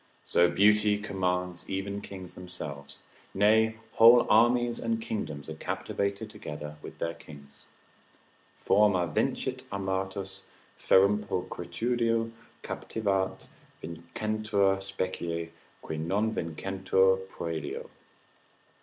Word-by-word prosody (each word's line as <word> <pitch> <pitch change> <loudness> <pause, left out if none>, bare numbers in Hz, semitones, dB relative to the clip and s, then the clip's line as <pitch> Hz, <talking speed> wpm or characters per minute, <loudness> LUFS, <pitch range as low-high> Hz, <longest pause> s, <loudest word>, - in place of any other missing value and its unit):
So 85 0 +4
beauty 105 +1 +4
commands 90 -3 -2
even 100 +1 -3
kings 95 -3 -9
themselves; 70 -6 -8 0.4
nay 110 +3 +4 0.2
whole 120 +1 +8
armies 120 +2 +4
and 115 0 -1
kingdoms 75 -10 -4
are 80 - -5
captivated 100 +6 -3
together 75 -8 -8
with - - -10
their 85 - -2
kings: 70 -3 -13 0.9
Forma 100 -3 +3
vincit 130 +10 -1
armatos, 95 0 -3 0.3
ferrum 100 +2 +4
pulchritudo 115 +5 -1 0.3
captivat; 100 -4 -2 0.3
vincentur 100 +4 -1
specie, 85 -3 -3 0.3
qui 80 - -4
non 100 +7 0
vincentur 95 +2 +1
proelio. 80 -5 -5
95 Hz, 90 wpm, -29 LUFS, 85-105 Hz, 0.9 s, whole